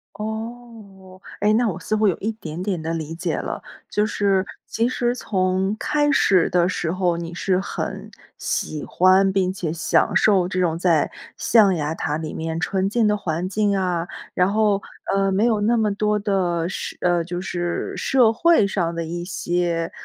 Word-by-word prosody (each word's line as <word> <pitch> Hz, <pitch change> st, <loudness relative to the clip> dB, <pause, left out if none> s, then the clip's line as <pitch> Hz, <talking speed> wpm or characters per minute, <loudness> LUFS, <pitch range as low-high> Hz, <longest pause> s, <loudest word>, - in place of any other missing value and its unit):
哦， 220 Hz, -3 st, -8 dB, 0.2 s
诶， 210 Hz, +1 st, +4 dB
那 235 Hz, +2 st, +3 dB
我 175 Hz, -, -5 dB
似 215 Hz, -, -2 dB
乎 215 Hz, 0 st, +3 dB
有 185 Hz, -, +1 dB
一 215 Hz, -, -2 dB
点 170 Hz, -6 st, -7 dB
点 185 Hz, -3 st, -2 dB
地 160 Hz, +1 st, -3 dB
理 160 Hz, -1 st, -4 dB
解 170 Hz, +1 st, -2 dB
了。 -, -, -4 dB, 0.3 s
就 210 Hz, -, +1 dB
是 195 Hz, -3 st, +1 dB, 0.2 s
其 230 Hz, +1 st, 0 dB
实 245 Hz, -1 st, 0 dB
从 190 Hz, -2 st, 0 dB
开 295 Hz, -1 st, +1 dB
始 190 Hz, -9 st, +3 dB
的 175 Hz, -1 st, +3 dB
时 170 Hz, -3 st, -2 dB
候， 180 Hz, -1 st, +1 dB
你 170 Hz, 0 st, -6 dB
是 185 Hz, +2 st, 0 dB
很 195 Hz, -, -5 dB, 0.3 s
喜 150 Hz, -2 st, -3 dB
欢 190 Hz, +2 st, +4 dB
并 190 Hz, -1 st, +1 dB
且 180 Hz, -5 st, -3 dB
享 165 Hz, 0 st, +1 dB
受 195 Hz, -4 st, +4 dB
这 185 Hz, 0 st, -2 dB
种 170 Hz, -3 st, +1 dB
在 170 Hz, -3 st, +2 dB, 0.3 s
象 210 Hz, -5 st, +4 dB
牙 155 Hz, -1 st, -2 dB
塔 150 Hz, -1 st, -2 dB
里 155 Hz, -1 st, -5 dB
面 160 Hz, 0 st, -3 dB
纯 190 Hz, +3 st, 0 dB
净 225 Hz, +1 st, +2 dB
的 210 Hz, -, +2 dB
环 175 Hz, -3 st, -2 dB
境 205 Hz, +1 st, +1 dB
啊， 180 Hz, -3 st, -1 dB, 0.3 s
然 180 Hz, +2 st, +2 dB
后， 210 Hz, -2 st, +2 dB, 0.3 s
呃， 195 Hz, 0 st, +2 dB
没 200 Hz, +4 st, +2 dB
有 220 Hz, -3 st, +2 dB
那 230 Hz, +3 st, +2 dB
么 215 Hz, -2 st, +1 dB
多 210 Hz, +1 st, 0 dB
的 180 Hz, -5 st, 0 dB
社 -, -, -5 dB
呃， 175 Hz, -1 st, +2 dB
就 175 Hz, +1 st, -4 dB
是 175 Hz, -2 st, -3 dB
社 250 Hz, -4 st, +3 dB
会 330 Hz, -4 st, +4 dB
上 175 Hz, -4 st, -1 dB
的 170 Hz, -, -2 dB
一 175 Hz, +2 st, -4 dB
些， 175 Hz, -2 st, -1 dB
190 Hz, 200 characters per minute, -22 LUFS, 175-210 Hz, 0.3 s, 诶